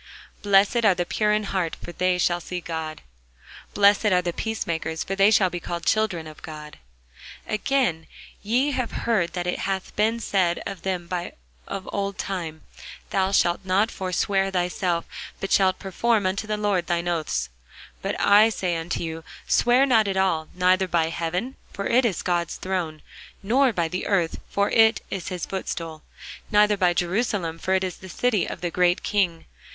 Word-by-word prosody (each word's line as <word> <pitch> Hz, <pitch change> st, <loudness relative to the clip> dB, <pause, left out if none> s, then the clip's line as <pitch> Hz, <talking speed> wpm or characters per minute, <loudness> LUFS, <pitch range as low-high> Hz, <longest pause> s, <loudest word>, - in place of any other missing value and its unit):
Blessed 205 Hz, +4 st, +4 dB
are 200 Hz, -4 st, +5 dB
the 175 Hz, 0 st, -1 dB
pure 210 Hz, +4 st, +1 dB
in 210 Hz, 0 st, +1 dB
heart: 185 Hz, -5 st, -2 dB
for -, -, -8 dB
they 180 Hz, +1 st, +1 dB
shall 175 Hz, 0 st, +1 dB
see 180 Hz, +1 st, -5 dB
God. 160 Hz, -2 st, -5 dB, 0.7 s
Blessed 205 Hz, +1 st, +5 dB
are 180 Hz, -3 st, +3 dB
the 175 Hz, -1 st, -2 dB
peacemakers: 170 Hz, -8 st, -3 dB
for 195 Hz, -, -3 dB
they 195 Hz, +1 st, +5 dB
shall 195 Hz, -4 st, +4 dB
be 175 Hz, -, -4 dB
called 170 Hz, 0 st, -5 dB
the -, -, +2 dB
children 210 Hz, -7 st, 0 dB
of 155 Hz, -1 st, -11 dB
God. 150 Hz, -1 st, -9 dB, 0.7 s
Again, 215 Hz, -, 0 dB, 0.3 s
ye 250 Hz, +7 st, +1 dB
have 255 Hz, -3 st, -2 dB
heard 195 Hz, -8 st, +1 dB
that 175 Hz, -1 st, -3 dB
it 180 Hz, -, -2 dB
hath 190 Hz, -1 st, -3 dB
been 220 Hz, +2 st, +1 dB
said 185 Hz, -6 st, 0 dB
by -, -, -3 dB
them 180 Hz, -3 st, -3 dB, 0.6 s
of 195 Hz, 0 st, -5 dB
old 200 Hz, -1 st, -2 dB
time, 165 Hz, -5 st, -4 dB, 0.5 s
Thou 190 Hz, 0 st, +1 dB
shalt 175 Hz, -2 st, +2 dB
not 195 Hz, +4 st, +2 dB
forswear 195 Hz, +1 st, 0 dB
thyself, 180 Hz, -1 st, -1 dB, 0.3 s
but 195 Hz, -, -4 dB
shalt 190 Hz, -1 st, +4 dB
perform 210 Hz, +2 st, 0 dB
unto 195 Hz, +3 st, -1 dB
the 215 Hz, 0 st, -1 dB
Lord 200 Hz, -5 st, 0 dB
thine 175 Hz, 0 st, -1 dB
oaths. 155 Hz, -, -1 dB, 0.5 s
But -, -, -3 dB
I 210 Hz, +2 st, +6 dB
say 185 Hz, -5 st, -2 dB
unto 165 Hz, +1 st, -3 dB
you, 165 Hz, 0 st, -5 dB, 0.2 s
Swear 245 Hz, +3 st, +4 dB
not 225 Hz, -6 st, +3 dB
at 195 Hz, -1 st, -1 dB
all; 165 Hz, -5 st, +1 dB
neither 185 Hz, +1 st, +3 dB
by 165 Hz, -2 st, +1 dB
heaven; 175 Hz, +10 st, -3 dB, 0.2 s
for 200 Hz, -, -4 dB
it 250 Hz, +2 st, +3 dB
is 200 Hz, -8 st, -1 dB
God's 175 Hz, -2 st, -1 dB
throne: 175 Hz, -5 st, -3 dB, 0.4 s
nor 255 Hz, +6 st, +3 dB
by 170 Hz, -6 st, 0 dB
the 180 Hz, +3 st, -4 dB
earth; 180 Hz, -5 st, +1 dB
for 200 Hz, 0 st, 0 dB
it 225 Hz, 0 st, +5 dB
is 190 Hz, -4 st, -4 dB
his 180 Hz, -2 st, -4 dB
footstool: 165 Hz, -4 st, -5 dB, 0.5 s
neither 210 Hz, 0 st, +4 dB
by 180 Hz, -3 st, +2 dB
Jerusalem; 175 Hz, -3 st, -1 dB
for 190 Hz, +2 st, 0 dB
it 190 Hz, -, +1 dB
is 185 Hz, -2 st, -3 dB
the 190 Hz, -, -11 dB
city 215 Hz, -1 st, +1 dB
of -, -, -6 dB
the 175 Hz, -1 st, -2 dB
great 180 Hz, 0 st, +2 dB
King. 180 Hz, -5 st, 0 dB
185 Hz, 180 wpm, -24 LUFS, 175-205 Hz, 0.7 s, I